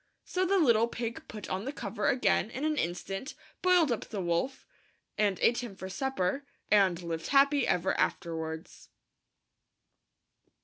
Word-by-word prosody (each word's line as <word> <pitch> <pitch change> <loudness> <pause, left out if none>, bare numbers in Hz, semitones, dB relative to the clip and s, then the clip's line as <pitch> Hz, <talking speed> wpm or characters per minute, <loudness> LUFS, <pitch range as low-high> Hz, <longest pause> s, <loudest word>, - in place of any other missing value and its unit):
So 370 0 0
the 395 +2 +3
little 235 - +4
pig 235 0 -5
put 210 -3 -8
on 190 +4 -3
the 275 - -2
cover 205 -6 -3
again 250 -3 +2
in 265 +5 -4
an 310 0 +1
instant, 195 - -3 0.3
boiled 360 -6 +4
up 235 - -1
the 210 - -5
wolf 175 +9 -1 0.5
and 205 -3 +1
ate 235 - +4
him 240 -5 -6
for 190 0 -7
supper, 265 +1 -1 0.3
and 195 -4 +4
lived 165 -1 -4
happy 280 0 +4
ever 180 +1 +1
afterwards. 160 -2 -3
220 Hz, 145 wpm, -30 LUFS, 185-270 Hz, 0.5 s, little